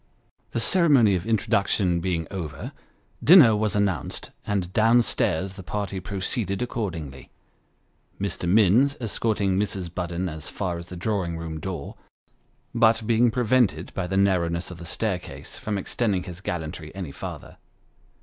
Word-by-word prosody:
The - - -2
ceremony 135 - +4
of 90 +3 -3
introduction 100 -4 +1
being 85 -2 -1
over, 80 -7 -5 0.5
dinner 150 - +8
was 105 -1 0
announced, 100 -6 -1 0.2
and 95 -3 -1
down 115 +2 +5
stairs 95 -1 -1
the - - -7
party 100 0 -3
proceeded 100 +2 -2
accordingly 85 - -5 0.9
Mr. 95 -3 -2
Minns 110 +8 +4
escorting 105 -4 0
Mrs. 95 -4 -3
Budden 90 0 -2
as 80 -2 -6
far 90 -2 -3
as 85 - -10
the 90 - -7
drawing 90 -3 -1
room 80 -1 -5
door, 90 +2 -6 0.8
but 115 -1 +3
being 115 +2 +4
prevented, 115 - +1
by 95 -2 -2
the 95 - -1
narrowness 90 -3 +1
of 90 - -9
the 85 - -8
staircase, 95 +2 -4
from 105 -1 -2
extending 100 -1 -1
his 90 -1 -9
gallantry 80 -3 -5
any 90 -7 -5
farther. - - -8
95 Hz, 140 wpm, -25 LUFS, 85-110 Hz, 0.9 s, dinner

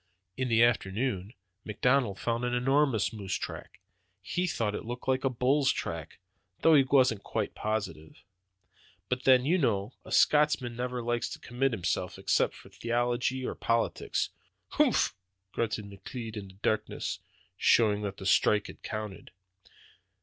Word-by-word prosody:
"In 130 -1 -2
the 115 0 +5
afternoon 110 -1 0 0.3
McDonald 120 0 +1
found 115 +1 -1
an 125 0 0
enormous 135 -2 +2
moose 100 -4 -3
track; - - -7 0.4
he 180 - -1
thought 115 -10 -1
it - - -4
looked 120 +3 -7
like 130 0 +1
a 135 - +3
bull's 130 +3 +2
track, 80 -2 -5 0.4
though 165 - +6
he 145 - +8
wasn't 130 -6 +3
quite - - -3
positive. 95 -8 -4 0.9
But 125 0 -2
then, 130 -1 +6
you 175 +5 +3
know, 105 -5 0
a - - -12
Scotchman 150 -5 +3
never 125 0 -3
likes 120 0 -1
to - - -7
commit 130 +3 -1
himself, 90 -7 -2
except - - +1
about 95 - -16
theology 120 +4 -1
or - - -2
politics." 115 0 -1 0.4
"Humph!" - - +2 0.4
grunted 110 -1 -2
McLeod 110 +3 -8
in 100 -2 -6
the 95 - -14
darkness, 110 0 -1 0.4
showing 105 -3 +4
that 100 -2 -4
the 95 - -8
strike 105 +2 +3
had - - -11
counted. 105 -3 -6
120 Hz, 150 wpm, -29 LUFS, 105-130 Hz, 0.9 s, he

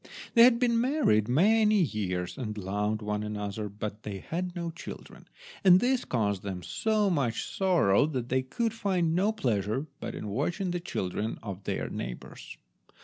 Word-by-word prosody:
They 235 -1 +9
had 245 -2 +5
been 235 -1 +2
married 245 - +2
many 210 - +4
years, 90 - -2
and 110 -5 -5
loved 105 +2 -2
one 105 0 -2
another, 105 0 -4
but 105 +1 -6
they 100 -3 -5
had 175 - -4
no 170 -1 -3
children, 165 - -10 0.4
and 185 -2 +8
this 255 +3 +1
caused 100 -5 0
them 95 -3 -5
so 215 - +1
much 135 -9 0
sorrow 165 - +3
that 125 -6 -3
they 130 +1 +2
could 225 - -2
find 185 -7 0
no 195 +5 +2
pleasure 120 - -1
but - - -5
in 105 - -5
watching 175 - -1
the 175 - -1
children 110 - -3
of 100 -3 -7
their - - -2
neighbours. - - -7
130 Hz, 165 wpm, -29 LUFS, -, 0.4 s, They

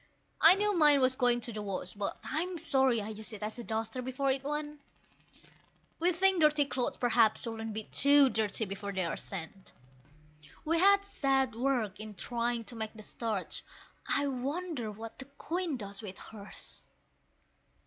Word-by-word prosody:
I 330 +3 +10
knew 415 0 +1
mine 295 -4 +6
was 260 0 +3
going 245 -2 +2
to 235 - -7
the 210 - -4
wash, 190 -3 -4
but 200 -1 -4
I'm 350 +3 -2
sorry 265 -8 +2
I 210 - -6
used 220 +1 -4
it 210 -1 -7
as 215 +3 -4
a - - -5
duster 225 +2 -3
before 260 +2 -1
it 265 0 -2
went; 295 +1 -4 1.2
We 350 +2 +3
think 375 0 +2
dirty 300 -1 +4
clothes 255 -3 -2
perhaps 230 -3 +3
shouldn't 225 -1 -4
be 220 +1 -4
too 285 +4 +5
dirty 220 -1 0
before 200 +1 -5
they 190 -2 0
are 165 - -2
sent. 190 +1 -7 0.9
We 330 +2 +2
had 400 +2 +5
sad 270 - +1
work 235 -5 -1
in 215 -1 -8
trying 235 +2 -2
to 230 +2 -7
make 220 -1 -4
the 215 - -10
starch 215 -3 -4 0.4
I 285 - +2
wonder 275 0 -3
what 225 +2 -9
the 270 - -5
Queen 315 +3 -3
does 200 -2 -7
with 195 -3 -8
hers? 210 -2 -8
245 Hz, 170 wpm, -31 LUFS, 215-290 Hz, 1.2 s, I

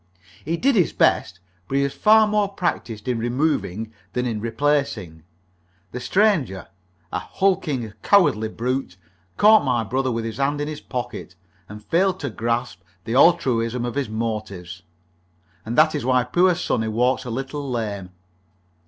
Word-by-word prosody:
He 165 +3 -2
did 270 +9 +2
his 185 -8 +2
best, 90 - +1 0.3
but 135 - -1
he 140 - +3
was 140 - -2
far 215 0 +5
more 210 -1 +1
practised 125 - -3
in 125 -2 0
removing 115 - -1 0.2
than 125 0 -1
in 110 -3 -2
replacing. 115 - -1 0.7
The 125 - -5
stranger 150 - +1 0.4
a 90 - -1
hulking, 150 - -1
cowardly 110 - +3
brute 125 -4 -3 0.4
caught 215 +1 +6
my 120 -3 +1
brother 130 +4 -1
with 115 -1 -2
his 115 0 -5
hand 140 +1 0
in 145 - -2
his 155 -1 -6
pocket, 120 -7 -6 0.3
and 105 +1 -10
failed 185 - +1
to 140 -4 -3
grasp 115 -3 -2 0.2
the 115 - -4
altruism 125 -6 +3
of 120 - -3
his 140 -4 -2
motives, 110 -5 -4 0.9
and 115 - -3
that 155 0 +5
is 150 - -3
why 125 0 +3
poor 175 +8 +3
Sunnie 110 -9 -1
walks 125 +4 +1
a 125 - -7
little 135 +4 -4
lame. 105 -6 -3
125 Hz, 155 wpm, -22 LUFS, 110-150 Hz, 0.9 s, caught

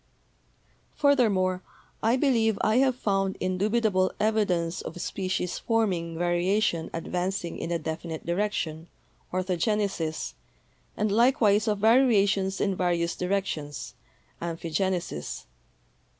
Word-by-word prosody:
Furthermore, 205 -10 +2 0.4
I 225 +2 +3
believe 230 -6 +2
I 215 +3 +3
have 260 -1 +3
found 195 -4 0
indubitable 185 +1 +1
evidence 190 -6 +1
of - - -7
species 185 -1 -2
form 225 -4 +1
ing 165 -1 -4
variation 175 0 +1
advancing 180 +1 -3
in - - -4
a 170 - +1
definite 160 0 -5
direction 170 -3 -2 0.4
(ortho 185 -1 -1
genesis) 195 -6 -1 0.6
and 210 -1 0
likewise 225 -2 +4
of 210 -1 +1
variations 205 -4 +3
in 195 -2 +1
various 175 -2 0
directions 180 -6 -3 0.5
(amphigenesis). 170 - -3
190 Hz, 105 wpm, -27 LUFS, 170-215 Hz, 0.6 s, likewise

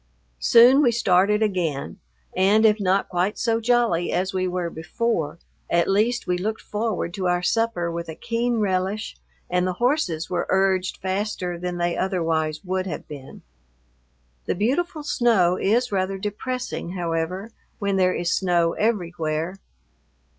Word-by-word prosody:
Soon 245 - +6
we 250 -5 +4
started 210 -1 +3
again, 175 -9 -2 0.4
and 200 +4 +4
if 215 0 +4
not 195 0 +1
quite 180 +3 -1
so 230 -2 +1
jolly 230 -7 +2
as 185 +2 -1
we 185 0 0
were 180 -2 -2
before, 165 -1 -2 0.3
at 170 0 +2
least 220 +5 +1
we 180 0 0
looked 215 +4 -3
forward 210 -5 -2
to 185 -1 -2
our 175 0 +1
supper 225 -6 0
with 170 0 -5
a 160 - -6
keen 235 +3 -1
relish 195 +1 -1 0.3
and 180 0 +1
the 185 - -1
horses 195 - 0
were 180 -1 -2
urged 190 -1 +1
faster 190 -2 -2
than 180 0 -3
they 175 0 0
otherwise 165 -5 -1
would 185 +1 -2
have 155 -5 -6
been. 140 -3 -10 1.0
The - - 0
beautiful 295 - -1
snow 220 -10 +3
is 230 +6 +1
rather 195 0 -1
depressing, 210 -1 -4
however, 175 +4 -3 0.3
when 200 -1 -1
there 185 -1 +3
is 175 0 0
snow 175 -3 +2
everywhere. 175 -5 -1
190 Hz, 145 wpm, -23 LUFS, 175-220 Hz, 1.0 s, Soon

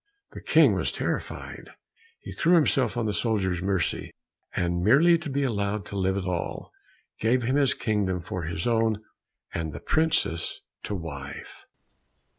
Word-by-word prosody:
The - - -9
King - - +5
was - - 0
terrified; - - -4 0.5
he - - -8
threw 170 +2 +3
himself 140 -6 +2
on 120 - 0
the 105 - 0
soldier's 95 -6 0
mercy, 95 -2 -1 0.5
and 85 0 0
merely 145 - +6
to 160 -2 -6
be 140 +1 0
allowed 100 -5 -1
to - - -8
live 95 0 +1
at 95 - -3
all, 90 -2 -3 0.5
gave 120 +3 +2
him 130 +4 +1
his 140 -2 +3
kingdom 100 -4 0
for 90 +1 -5
his 85 +1 -3
own, 110 -2 +1 0.5
and 80 -2 -3
the - - -6
princess 155 - 0 0.2
to 105 - -3
wife. 70 -6 -8
105 Hz, 155 wpm, -26 LUFS, 90-125 Hz, 0.5 s, merely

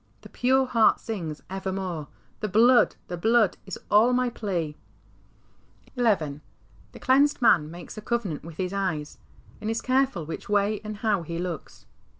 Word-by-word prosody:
The - - -13
pure 260 +2 +2
heart 230 -3 +3
sings 170 -10 -5
evermore, 190 -5 -4 0.2
" - - -36
The 215 - -2
Blood, 235 +5 +5
the 175 - -5
Blood, 225 +2 +3
is 190 - -5
all 225 +4 +5
my 250 -1 +1
plea." 175 -10 -3 1.2
XI. - - -8 0.9
The - - -12
clea7ised 280 +3 +3
man 175 -11 +4
makes 175 +5 -9
a - - -9
covenant 210 -9 -2
with 165 -1 -10
his 185 0 -2
eyes, 175 -7 -3 0.4
and 215 - -3
is 225 +1 -1
careful 260 - +1
which 165 - -7
way 205 +1 +1
a77d 215 0 -7
how 210 -5 +1
he 165 0 -5
looks. 175 -2 -6
205 Hz, 160 wpm, -26 LUFS, 175-235 Hz, 1.2 s, Blood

